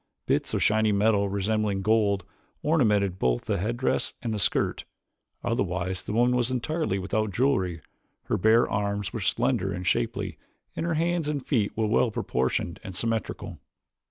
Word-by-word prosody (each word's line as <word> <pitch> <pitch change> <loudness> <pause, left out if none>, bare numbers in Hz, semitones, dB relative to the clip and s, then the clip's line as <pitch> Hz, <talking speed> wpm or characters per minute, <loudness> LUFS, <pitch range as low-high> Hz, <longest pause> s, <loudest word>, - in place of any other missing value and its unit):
Bits - - 0
of - - +1
shiny 110 0 +3
metal 100 0 +2
resembling 100 0 0
gold, 100 -3 +2 0.4
ornamented 105 - +2
both - - +1
the - - 0
headdress 120 +6 -1
and 115 -2 -1
the 105 - -2
skirt. 90 - +2 0.6
Otherwise 95 -5 -1
the - - -6
woman 120 +2 +3
was 125 -1 +1
entirely 130 - -1
without 100 +3 -1
jewelry. 95 - +1 0.4
Her - - -1
bare 110 +4 +5
arms 100 0 -2
were 115 - -3
slender 115 -1 0
and 90 0 -4
shapely - - -1 0.4
and 165 - -2
her 165 - 0
hands 165 -1 0
and 145 -3 -3
feet 110 -8 +1
well 110 +2 +2
proportioned 70 - -1
and 95 - -7
symmetrical. 115 +1 -3
110 Hz, 155 wpm, -27 LUFS, 95-120 Hz, 0.6 s, bare